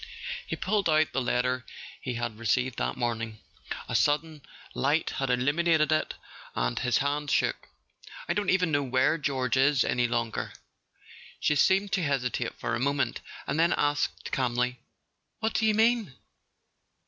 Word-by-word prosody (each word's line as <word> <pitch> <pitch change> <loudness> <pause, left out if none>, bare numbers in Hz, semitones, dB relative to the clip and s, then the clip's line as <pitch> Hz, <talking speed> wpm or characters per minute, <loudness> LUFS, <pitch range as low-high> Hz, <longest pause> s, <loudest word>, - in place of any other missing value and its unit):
He - - -2
pulled 195 -1 0
out 155 0 +3
the 135 - 0
letter 125 0 0 0.4
he 125 -2 -3
had 120 -2 -3
re¬ - - -16
ceived 125 +2 +1
that - - -2
morning. 115 -2 -2 0.5
A - - -5
sudden 150 +1 +1 0.3
light 150 +4 +1
had 135 -1 -2
illuminated 155 +5 +2
it, 155 - +1 0.4
and - - 0
his 125 -4 +2
hand 145 +3 -1
shook. - - 0 0.6
"I 175 - +1
don't 200 +1 -1
even 180 -3 +2
know 145 -1 +2
where 130 +4 +2
George 130 -3 0
is 135 0 +4
any 125 -1 +1
longer." 120 -2 -2 0.9
She - - +2
seemed 190 +7 +3
to 185 - +1
hesitate 125 -4 -1
for 115 - -3
a 120 - 0
moment, 140 +2 0 0.2
and 145 +3 -1
then 170 +2 +4
asked 145 0 -1
calmly: 125 -1 0 0.3
" - - -51
What 220 0 -1
do 220 - +2
you 215 - +3
mean 225 - +3
140 Hz, 160 wpm, -28 LUFS, 125-160 Hz, 0.9 s, is